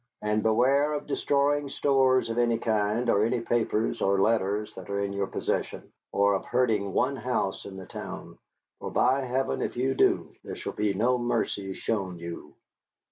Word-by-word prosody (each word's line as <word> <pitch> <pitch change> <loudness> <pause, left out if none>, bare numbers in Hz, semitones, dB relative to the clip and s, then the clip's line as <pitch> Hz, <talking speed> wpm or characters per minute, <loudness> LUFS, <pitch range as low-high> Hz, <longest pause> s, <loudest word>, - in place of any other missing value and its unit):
And 105 0 +1
beware 130 +7 +3
of 150 - -3
destroying 145 0 +1
stores 130 -3 +2
of 115 - -1
any 120 -1 +2
kind, 110 +1 0
or 105 -2 +3
any 120 +2 +1
papers 115 -1 0
or 100 0 +2
letters 105 0 +1
that 95 0 -10
are 100 0 -1
in 100 0 -2
your 100 -1 -1
possession; - - -3 0.2
or 100 0 +3
of 95 - -1
hurting 110 -6 +1
one 130 +8 +1
house 125 -7 -2
in 95 - -8
the 95 - -8
town. - - -8 0.4
For, - - -5
by 130 +3 +2
Heaven! 130 +1 -1
if - - -3
you 130 +2 +1
do, - - +2
there - - -6
shall - - -5
be 105 -2 0
no 125 +5 +2
mercy 100 -5 -1
shown 95 -4 -3
you. 85 0 -8
115 Hz, 180 wpm, -27 LUFS, 100-125 Hz, 0.4 s, beware